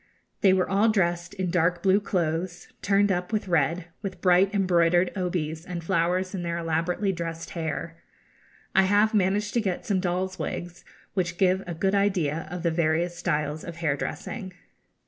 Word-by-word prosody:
They 195 - +6
were 185 -1 +2
all 200 +4 +3
dressed 175 -4 0
in 185 -2 -2
dark 175 0 +1
blue 195 +1 +5
clothes, 175 -2 -2
turned 200 0 +3
up 180 +1 -2
with 215 -2 -1
red, 170 +1 +1
with 190 -3 -5
bright 185 +2 +4
embroidered 175 -2 +3
obis 170 -4 -2
and 175 -2 -6
flowers 180 +3 0
in 190 - -3
their 170 -1 -2
elaborately 170 +4 0
dressed 165 -2 -5
hair. 165 0 -4 0.7
I 190 - +6
have 205 +3 +3
managed 205 +1 +1
to 235 - +2
get 190 -4 -2
some 200 -6 +1
dolls' 185 +1 -2
wigs, 175 0 -5 0.3
which 180 -2 -1
give 190 0 +3
a 170 - -4
good 190 +4 0
idea 180 -7 +1
of 180 +1 -5
the 170 - +2
various 165 +1 +1
styles 155 -3 -2
of 170 - -7
hair 160 -4 0
dressing. 190 - -5
180 Hz, 170 wpm, -26 LUFS, 170-190 Hz, 0.7 s, They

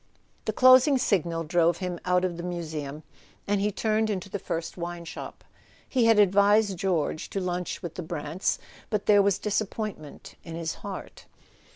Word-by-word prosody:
The - - 0
closing 255 +2 +7
signal 170 -8 0
drove 170 +1 +2
him 180 -2 -4
out 180 0 +2
of 175 -2 -2
the 170 - -6
Museum, 155 -4 -5 0.4
and 205 -1 +1
he 210 +1 +1
turned 220 +1 0
into 195 -2 -3
the 200 - -3
first 165 -2 -4
wine 170 -1 -5
shop. 165 - -8 0.4
He 250 -3 +2
had 225 -1 +5
advised 205 +1 +4
George 175 -4 -1
to 195 - -2
lunch 180 -1 -3
with 170 -2 -5
the - - -5
Brants, 160 +1 -2 0.3
but 210 -2 -1
there 205 -1 +6
was 200 -1 +2
dis¬ 210 0 0
appointment 205 -8 -7
in 165 -1 -7
his 165 -1 -3
heart. 200 -2 -8
180 Hz, 175 wpm, -27 LUFS, 170-205 Hz, 0.4 s, closing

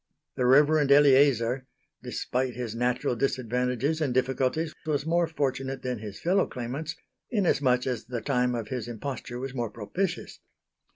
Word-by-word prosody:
The 125 - 0
Reverend 145 +2 +5
Eleazar, 135 -3 +5 0.3
despite 125 -1 -2
his 120 -3 -4
natural 125 +1 0
disadvantages 125 +4 0
and 135 -5 0
difficulties, 135 +5 0
was 145 -1 0
more 170 +1 +2
fortunate 135 -3 -2
than 125 -3 -2
his 105 -2 -8
fellow 185 +4 +2
claimants 135 +7 -5 0.3
inasmuch 140 - +2
as 125 -4 -2
the 120 -1 -4
time 125 0 0
of 115 -2 -4
his 125 -3 -4
imposture 120 +1 -5
was 135 +1 -5
more 120 -4 -2
propitious. 165 - -4
130 Hz, 140 wpm, -27 LUFS, 125-145 Hz, 0.3 s, Reverend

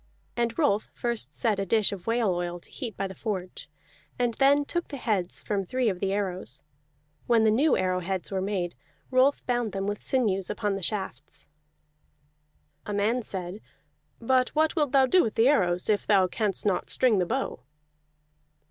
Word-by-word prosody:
And 235 -1 -1
Rolf 220 -10 +1
first 235 -2 -2
set 220 -5 0
a 195 - -1
dish 215 +1 +3
of 195 -1 -7
whale 230 -4 +2
oil 175 0 -3
to - - -18
heat 235 -8 -6
by 195 - -1
the 190 - -5
forge, 190 -3 -5 0.5
and 245 -1 +1
then 285 +1 +5
took 345 +3 -2
the 280 - -6
heads 205 -8 -1
from 200 -2 -1
three 250 +5 0
of 185 -3 -3
the 195 0 -1
arrows. 185 - -3 0.6
When 230 -2 +4
the 220 - +4
new 275 +7 +3
arrow 185 -1 0
heads 185 +1 -3
were 190 -1 -1
made, 190 -3 -2 0.4
Rolf 260 +2 +3
bound 240 -4 -1
them 195 0 -2
with 205 0 -3
sinews 200 -8 +1
upon 210 -1 -1
the 195 - -5
shafts. 190 - -4 1.4
A 210 - -3
man 215 +5 +1
said: 190 -1 -5 0.6
"But 255 +2 +2
what 310 +1 +2
wilt 295 -4 +1
thou 270 -2 +5
do 360 +8 +4
with 220 - -2
the 225 +2 +4
arrows 180 -11 +2
if 210 -2 +1
thou 195 -3 +5
canst 200 +2 -2
not 195 -3 0
string 240 -6 +3
the 180 - 0
bow?" 265 - -2
210 Hz, 185 wpm, -27 LUFS, 190-245 Hz, 1.4 s, then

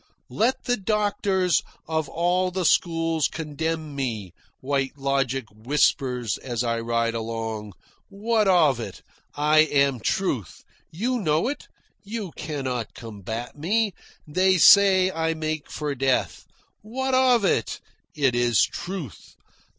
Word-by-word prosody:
"Let 240 +4 0
the 245 -1 0
doctors 200 -4 +1 0.3
of 160 -2 -1
all 180 +2 +1
the 180 0 -2
schools 165 -2 +2
condemn 160 0 -4
me," 110 - -4 0.3
White 135 0 -2
Logic 135 -2 -1
whispers 125 0 0
as 120 -2 -3
I 115 -1 -1
ride 115 0 0
along. 110 -2 -4 0.4
"What 215 +1 0
of 155 -9 +4
it? 115 - -7 0.3
I 150 +1 +3
am 140 -4 +3
truth. 125 - -2 0.3
You 240 +9 -2
know 160 +1 +1
it. 290 - -6 0.4
You 210 -3 -5
cannot 130 -6 -4
combat 115 +2 -7
me. 205 +7 0 0.3
They 185 +4 +3
say 190 0 +7
I 160 -1 -1
make 155 -1 -4
for 150 -1 -3
death. 135 -1 0 0.4
What 260 +5 -3
of 255 -4 +4
it? 115 - 0 0.4
It 140 -4 +2
is 120 -2 +3
truth. 175 - -6
155 Hz, 125 wpm, -24 LUFS, 125-190 Hz, 0.4 s, say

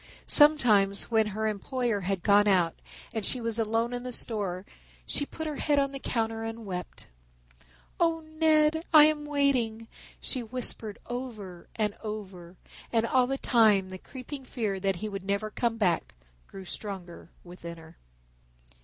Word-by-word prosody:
Sometimes 235 -11 +6
when 220 -1 +3
her 215 +1 -2
employer 230 +1 -1
had 190 -1 -2
gone 205 0 +5
out 180 -4 +3 0.4
and 220 -2 -3
she 250 - 0
was 230 -1 -2
alone 225 +2 0
in 245 - -3
the 250 0 -6
store 200 -6 -4 0.4
she 285 - 0
put 320 - -7
her 305 -2 -4
head 295 -2 +1
on 275 -1 +2
the 275 - -6
counter 225 -3 -2
and 225 0 -6
wept. 180 -3 -7 0.9
"Oh, 330 -1 +2
Ned, 315 0 +2
I 305 -2 +9
am 305 -1 0
waiting," 255 -6 0 0.3
she 255 - -2
whispered 225 -3 -2
over 220 -8 -7
and 210 -2 0
over, 190 -5 -7 0.4
and 230 -1 +2
all 250 +1 +2
the 270 +1 -2
time 215 -8 +3
the 185 0 -8
creeping 265 +4 -9
fear 215 -7 -3
that 195 0 0
he 215 +5 -5
would 200 -2 -5
never 200 +3 -2
come 235 0 -1
back 180 - 0 0.3
grew 195 -1 -10
stronger 180 -2 -8
within 170 -1 -9
her. 160 +1 -15
225 Hz, 160 wpm, -28 LUFS, 195-255 Hz, 0.9 s, I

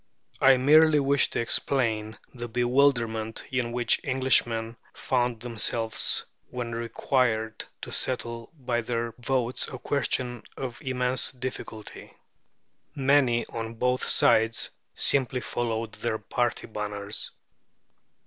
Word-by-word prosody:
I 135 -1 +7
merely 150 +3 +6
wish 140 -1 +2
to - - -2
explain 110 -3 0 0.2
the 120 -2 -5
bewilderment 120 -2 +1
in 125 -2 -1
which 120 -1 +1
Englishmen 120 -4 +1 0.2
found 120 -3 0
themselves 115 -1 +1 0.2
when 120 -2 -4
required 115 -1 0 0.2
to - - -6
settle 115 -2 -2
by 125 -3 -1
their 115 0 -2
votes 125 0 -1
a 130 - -7
question 125 -3 -1 0.2
of 130 -1 -5
immense 130 -2 0
difficulty. 125 -4 -7 0.8
Many, 135 -4 +3
on 115 0 -4
both 125 +2 0
sides, 115 +1 +3 0.2
simply 130 -2 +2
followed 115 -2 -2
their 110 0 -2
party 120 +3 -1
banners. 105 -1 -3
120 Hz, 110 wpm, -27 LUFS, 115-130 Hz, 0.8 s, I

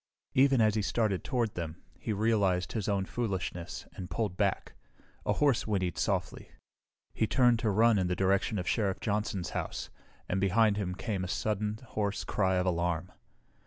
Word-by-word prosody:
Even 135 -2 +5
as 110 -1 +4
he 110 - +1
started 100 -2 0
toward 120 -4 0
them 85 -2 -6 0.2
he - - -3
realized 100 -4 +1
his 110 -3 -2
own 100 -2 +1
foolishness 95 -6 -3
and 90 -1 -7
pulled 95 +1 -2
back. 100 -1 0 0.5
A - - +3
horse 140 -7 +2
whinnied 95 -4 0
softly. - - -1 0.6
He 110 - +1
turned 120 -2 +4
to 110 - +1
run 110 +1 +4
in 90 - +1
the 90 - 0
direction 95 +3 +1
of 90 -2 -3
Sheriff 100 0 0
Johnson's 105 -4 -2
house, - - -4 0.4
and 95 +1 -1
behind 105 +2 +4
him 90 -3 -2
came 100 -3 -3
a - - -3
sudden, 105 +2 -1
hoarse 105 -1 -1
cry 95 -2 +1
of 90 0 +1
alarm. 85 0 0
100 Hz, 170 wpm, -30 LUFS, 90-110 Hz, 0.6 s, Even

